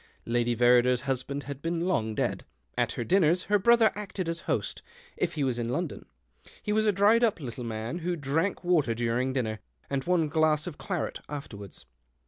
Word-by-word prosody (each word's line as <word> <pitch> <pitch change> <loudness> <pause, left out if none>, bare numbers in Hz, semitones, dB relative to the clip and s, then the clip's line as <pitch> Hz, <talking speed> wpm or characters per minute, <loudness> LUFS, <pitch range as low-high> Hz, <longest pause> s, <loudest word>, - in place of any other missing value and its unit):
Lady 120 0 +1
Verrider's 125 +1 +4
husband 135 +1 -3
had 140 -1 -7
been 165 +1 -1
long 115 -12 0
dead. - - -1 0.3
At - - 0
her 120 - -3
dinners 180 +2 +3
her 205 0 +2
brother 235 +2 +5
acted 195 -3 -5
as 165 0 -2
host, - - -1 0.3
if - - -1
he 150 - 0
was 125 -3 0
in 115 0 -2
London. 160 - -3 0.6
He 210 - -1
was 215 0 +2
a - - +5
dried 205 +4 +4
up 220 -6 +2
little 125 -3 -6
man, 115 +7 -4
who 175 +1 -1
drank 160 +7 -1
water 160 -10 +2
during 120 +3 0
dinner, 110 -5 -2 0.3
and 135 -1 0
one 175 -3 +2
glass 155 0 +2
of 165 -4 -7
claret 180 -6 -3
afterwards. 105 -9 -8
145 Hz, 185 wpm, -28 LUFS, 120-180 Hz, 0.6 s, brother